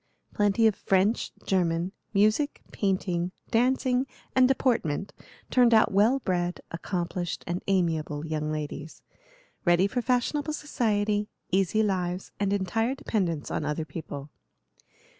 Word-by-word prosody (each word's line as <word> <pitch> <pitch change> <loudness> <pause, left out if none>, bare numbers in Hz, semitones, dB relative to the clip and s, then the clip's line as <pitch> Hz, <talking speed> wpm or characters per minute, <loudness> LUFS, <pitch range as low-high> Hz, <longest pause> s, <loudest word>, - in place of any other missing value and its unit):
Plenty 205 +2 +3
of 220 - +5
French, 195 +4 +1
German, 175 -1 +1 0.2
music, 215 +8 +2
painting, 185 -3 0 0.2
dancing, 255 +2 +2 0.3
and 255 -1 +6
deportment 230 - 0 0.4
turned 245 -2 +5
out 220 - +5
well 210 +7 +4
bred, 180 -7 -1
accomplished, 175 0 -3
and 175 +2 -2
amiable 160 -5 0
young 155 -1 -2
ladies, 150 0 -5 0.6
ready 175 0 +4
for 245 +5 -1
fashionable 265 +5 0
society, 210 -8 0 0.2
easy 195 +3 +2
lives, 185 -2 -1
and 200 -1 +1
entire 225 +6 0
dependence 175 - -2
on - - -1
other 155 +1 -2
people. 145 -1 -7
195 Hz, 120 wpm, -27 LUFS, 170-225 Hz, 0.6 s, and